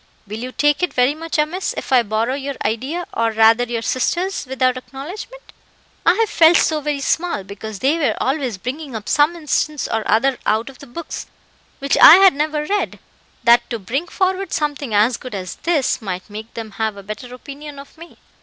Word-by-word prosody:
Will 210 +2 -7
you 250 +2 -5
take 295 +3 +1
it 360 - -1
very 250 +3 +3
much 325 +1 -4
amiss 315 +5 -1
if - - -6
I 255 -2 +6
borrow 225 +3 -1
your 280 0 -4
idea, 270 +11 -2
or 230 0 +1
rather 225 +2 +4
your 235 -1 -3
sister's, 345 +8 -1
without 255 -1 +1
acknowledgement? 290 - -9 0.5
I 340 - +6
have 450 +1 +2
felt 330 -3 +6
so 310 -1 +1
very 295 -1 -2
small, 335 - -1
because 200 +2 -8
they 280 - +1
were 265 -9 +1
always 265 -6 -1
bringing 260 +5 -6
up 215 -1 -6
some 295 +4 +3
instance 305 -2 -1
or 225 - -1
other 255 +4 +2
out 220 +5 0
of 260 - -20
books 330 +5 -6 0.5
which 275 -1 0
I 320 - +11
had 385 0 +7
never 300 +1 -1
read, 410 +5 -1 0.5
that 235 0 +5
to 235 - -2
bring 260 - -3
forward 375 0 -1
something 290 -4 -2
as 220 +4 +3
good 255 -4 -8
as 185 -2 -6
this, 300 -7 0
might 185 -1 -6
make 220 +2 -8
them 225 -2 -6
have 220 -2 -1
a 200 - -10
better 215 +5 -8
opinion 280 +3 -10
of 280 0 -12
me." 335 +1 -14
270 Hz, 195 wpm, -19 LUFS, 230-310 Hz, 0.5 s, I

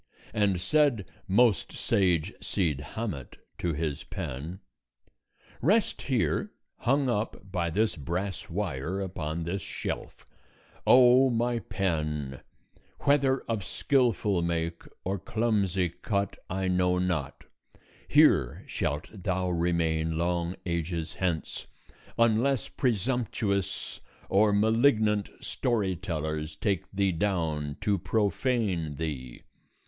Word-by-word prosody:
And 100 -4 +2
said 120 - +2 0.2
most 110 +1 +3
sage 90 -1 +1
Cid 80 -8 0
Hamet 100 - -4 0.2
to 85 -2 0
his 75 -2 -2
pen: 75 +9 -5 1.0
"Rest 200 - +2
here, 135 - 0 0.3
hung 135 +2 +2
up 105 -4 -2
by 85 -3 0
this 105 +7 +1
brass 95 +6 -3
wire, 90 -2 -2
upon 85 -4 -3
this 90 +4 -2
shelf. - - -5 0.6
O 130 +1 +7
my 120 0 +1
pen! 75 - -2 0.6
whether 135 -2 +3
of 110 -4 -3
skillful 110 -7 +1
make 85 0 -1 0.2
or 95 +1 -2
clumsy 100 -4 +1
cut 100 +4 -2
I 95 +1 -1
know 90 0 +2
not; 85 -7 -2 0.6
here 70 +10 +4
shalt 75 +2 -2
thou 95 -2 -1
remain 80 -2 +1
long 85 +1 0
ages 85 -1 -2
hence, 90 -4 -2 0.5
unless 115 +3 +3
presumptuous 115 - -1 0.3
or 105 +2 +4
malignant 110 -1 +3
story 105 -7 0
tellers 80 -3 -3
take 95 +3 -1
thee 100 -1 +1
down 80 -5 -1
to 100 -2 +1
profane 100 - 0
thee. 70 -6 -5
95 Hz, 105 wpm, -28 LUFS, 85-110 Hz, 1.0 s, O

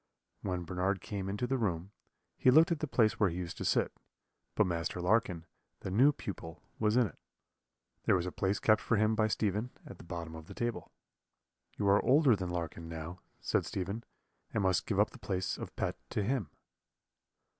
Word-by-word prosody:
When 90 -2 -2
Bernard 95 +3 0
came 95 0 -4
into 105 +5 -1
the 130 +1 0
room, 95 -3 -1 0.4
he - - +4
looked 160 +6 +7
at 165 - +1
the 155 - -2
place 110 -5 +2
where 105 -3 +4
he 85 - -5
used 90 -2 -4
to - - -3
sit, - - +2 0.6
but - - +4
Master 85 0 -2
Larkin, 90 -3 +1 0.4
the 95 - -4
new 130 +9 +6
pupil, 80 - -7 0.2
was 110 +1 +3
in 125 - +5
it. - - -8 0.9
There - - +5
was 90 -1 0
a 90 - -3
place 95 +3 0
kept 110 -1 +4
for 115 - +1
him 110 +1 +3
by 110 0 +3
Stephen 105 +2 0 0.2
at 100 - -10
the - - -10
bottom 85 -1 -6
of 80 0 -9
the - - -10
table. 120 -1 -3 0.9
"'You 100 - 0
are 100 +1 +5
older 135 -2 +5
than 95 -2 -3
Larkin, 85 -1 -4
Low,' 80 +2 -6 0.2
said - - +1
Stephen, 100 +5 -3 0.5
'and 105 - 0
must 95 -2 +2
give 100 -3 0
up 105 +1 +4
the - - -13
place 95 -3 -2
of - - -8
pet - - -1
to 105 - -1
him.' 115 - -1
100 Hz, 200 wpm, -32 LUFS, 90-110 Hz, 0.9 s, looked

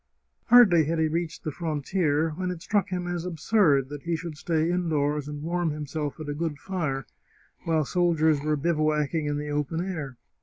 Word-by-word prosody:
Hardly 195 -10 +7
had 165 +3 -1
he 160 0 +2
reached 165 +1 -3
the 155 - -2
frontier, 160 0 0
when 180 +4 -3
it 180 -2 -5
struck 205 -2 +1
him 180 -1 -3
as 175 -1 -2
absurd 165 -5 +2
that 145 -1 -7
he 170 +2 -1
should 165 -1 -6
stay 160 +2 0
indoors 150 -5 0
and 150 0 -6
warm 170 0 0
himself 150 0 -4
at 155 - -6
a 145 - -2
good 155 -1 -3
fire 150 -8 -3 0.6
while 160 -2 +1
soldiers 160 -3 +2
were 150 0 0
bivouacking 155 0 0
in 145 0 -1
the 150 0 -4
open 150 +2 -1
air. 145 -9 -5
160 Hz, 185 wpm, -26 LUFS, 150-175 Hz, 0.6 s, Hardly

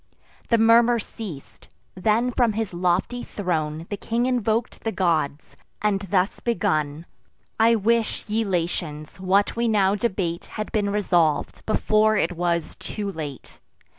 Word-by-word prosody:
The 230 - +4
murmur 230 +1 +5
ceas'd: 205 - -8 0.3
then 220 +6 +1
from 240 -2 +2
his 220 -3 -3
lofty 180 +7 0
throne 160 -5 -2
The 205 - -2
king 235 +4 -1
invok'd 235 -2 0
the 225 - -2
gods, 160 -7 -1 0.2
and 210 -2 +1
thus 190 0 +1
begun: 155 -8 -1 0.5
"I 230 +1 +5
wish, 225 +1 +1
ye 220 +2 0
Latins, 170 -5 -3
what 190 +2 +2
we 235 0 +1
now 200 -3 +3
debate 190 -5 -2
Had 215 -1 -6
been 210 -3 0
resolv'd 175 -7 +1
before 215 0 +3
it 170 - +1
was 170 -2 -1
too 205 -2 -4
late. 150 -7 -8
200 Hz, 135 wpm, -24 LUFS, 170-225 Hz, 0.5 s, murmur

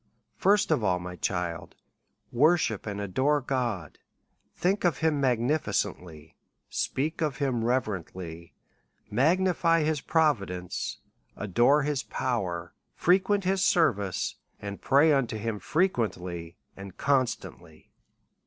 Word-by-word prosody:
First 205 -1 +3
of 145 -8 +2
all, 90 -3 +2
my 90 0 -7
child, 90 -2 -3 0.6
worship 140 - +2
and 100 -1 -4
adore 130 +10 +1
God, 120 - -3 0.6
think 190 +3 0
of 170 -7 +2
him 160 -3 +1
magnificently, 115 - -1 0.4
speak 155 +5 -2
of 150 -4 -1
him 130 -5 0
reverently, 95 -8 -3 0.6
magni 175 - +3
fy 165 -1 +2
his 155 -2 0
providence, 100 - 0 0.4
adore 120 +9 +3
his 145 -2 -1
power, 90 -12 -3 0.2
frequent 195 +3 +2
his 190 +1 +1
ser 165 -9 +4
vice, 100 -2 -3 0.2
and 100 -1 -7
pray 145 +3 +5
unto 130 -5 0
him 110 -1 -3
frequently 90 - -1 0.2
and 95 -1 -10
constantly. 125 - -2
125 Hz, 115 wpm, -28 LUFS, 95-155 Hz, 0.6 s, pray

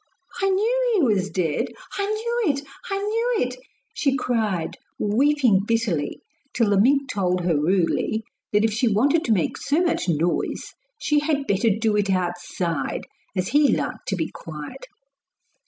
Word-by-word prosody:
'I 390 - +3
knew 475 +6 +2
he 370 - +3
was 195 -1 -1
dead 165 -5 0 0.3
I 400 - 0
knew 445 -2 0
it! 280 - -4 0.3
I 390 - 0
knew 455 +4 0
it!' 250 -5 -1 0.4
she 275 -2 +1
cried, 215 - -1 0.2
weeping 250 0 +3
bitterly, 225 -10 0 0.3
till 225 -4 +2
the 195 -1 +4
mink 275 +4 +3
told 180 -5 0
her 175 -2 +1
rudely 180 +7 +1 0.3
that 210 +1 +3
if 220 - 0
she 230 +3 +1
wanted 275 +10 +3
to 230 - 0
make 190 -7 +1
so 290 +3 +1
much 350 - 0
noise 170 +2 -1 0.3
she 300 -1 +2
had 290 -2 0
better 205 0 +2
do 220 +1 +1
it 205 -1 +1
outside 175 -4 -2 0.3
as 185 0 0
he 295 0 +5
liked - - -4
to 195 - 0
be 160 -3 -2
quiet. 160 - -9
225 Hz, 160 wpm, -23 LUFS, 185-300 Hz, 0.4 s, he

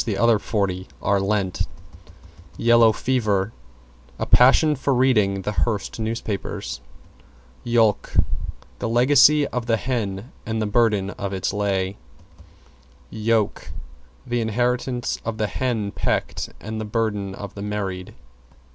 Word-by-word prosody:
=YELLOW 115 +2 +2 2.6
FEVER= 110 -4 0 0.6
A - - -2
passion 145 +5 +5
for 135 0 0
reading 105 -7 +3
the 105 - -1
Hearst 105 0 -1
newspapers. 110 - -4 0.8
=YOLK= 115 -3 +2 0.7
The 120 - -2
legacy 140 +5 +5
of 125 -2 -3
the 115 -1 +3
hen 115 -3 -3
and 110 0 -2
the 110 - 0
burden 105 -2 +2
of 100 -1 -5
its 95 0 -2
lay. 100 -1 -1 1.1
=YOKE= 110 -1 0 0.6
The 120 0 -1
inheritance 120 +2 -1
of 115 -1 -3
the 110 - 0
hen 110 -3 -2
pecked - - -2
and 110 0 -5
the - - -4
burden 105 -3 -2
of 100 -1 -8
the 100 - -8
married. 100 -3 -4
110 Hz, 110 wpm, -23 LUFS, 100-120 Hz, 2.6 s, passion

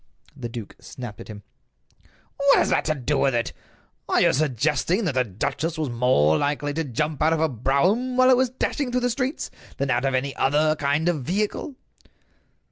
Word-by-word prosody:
The 120 - -6
duke 115 -3 -8
snapped 120 -5 -9
at - - -11
him: 105 -2 -10 0.9
"What 280 0 +4
has - - +2
that - - +1
to 155 - 0
do 140 +1 -1
with 135 -3 +2
it? 120 0 -1 0.6
Are - - +3
you - - +4
suggesting 150 - 0
that 160 - 0
the 130 0 +2
duchess 140 - -3
was 155 -5 -2
more 115 - +3
likely 145 0 -1
to 165 +2 -1
jump 150 +2 -3
out 160 +1 +4
of 165 - 0
a 160 - +3
brougham 175 - 0
while 255 0 +6
it - - +7
was 260 0 +2
dashing 260 +1 -2
through 250 0 0
the 245 0 +1
streets 260 +4 -3 0.3
than 140 -1 -1
out 120 +2 +1
of 135 -1 +1
any 135 +1 -2
other 155 +3 +2
kind 145 +3 0
of 170 -5 0
vehicle?" 210 - -2
150 Hz, 200 wpm, -24 LUFS, 130-180 Hz, 0.9 s, it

